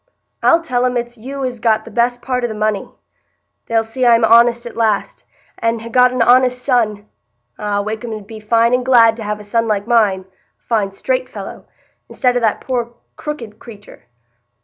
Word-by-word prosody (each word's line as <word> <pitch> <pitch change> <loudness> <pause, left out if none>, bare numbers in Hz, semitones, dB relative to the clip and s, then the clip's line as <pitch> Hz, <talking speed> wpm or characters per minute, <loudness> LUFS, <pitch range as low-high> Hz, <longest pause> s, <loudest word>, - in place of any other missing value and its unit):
I'll 335 - +4
tell 250 -5 -1
'em 250 0 -1
it's 240 0 -4
you 265 +4 -6
as 250 -2 -4
got 220 -1 +1
the - - -11
best 245 +1 0
part 250 -1 -2
o' - - +1
the 220 - -6
money. 215 -1 -2 0.8
They'll 225 -1 +1
see 225 +4 -4
I'm 230 -2 +5
honest 235 +1 +4
at 235 - -8
last, 220 -3 -1 0.3
and 230 0 0
ha' 230 - -8
got 250 +1 +5
an 255 -2 +1
honest 250 +1 +4
son. 215 -6 0 0.5
Ah! 205 -1 -1
Wakem 220 +3 -5
'ud 215 -2 -7
be 220 +1 -10
fine 230 +2 +2
and 250 0 +2
glad 235 -3 +5
to 225 - -6
have 210 0 -3
a - - -10
son 230 +2 -1
like 205 -2 -1
mine,—a 210 -5 +2 0.3
fine 210 -4 -1
straight - - -2
fellow,—i'stead 250 -2 -5
o' - - +2
that 225 -3 0
poor 240 -2 -3 0.2
crooked 235 -8 -7
creatur! 205 - -14
230 Hz, 190 wpm, -17 LUFS, 215-245 Hz, 0.8 s, I'm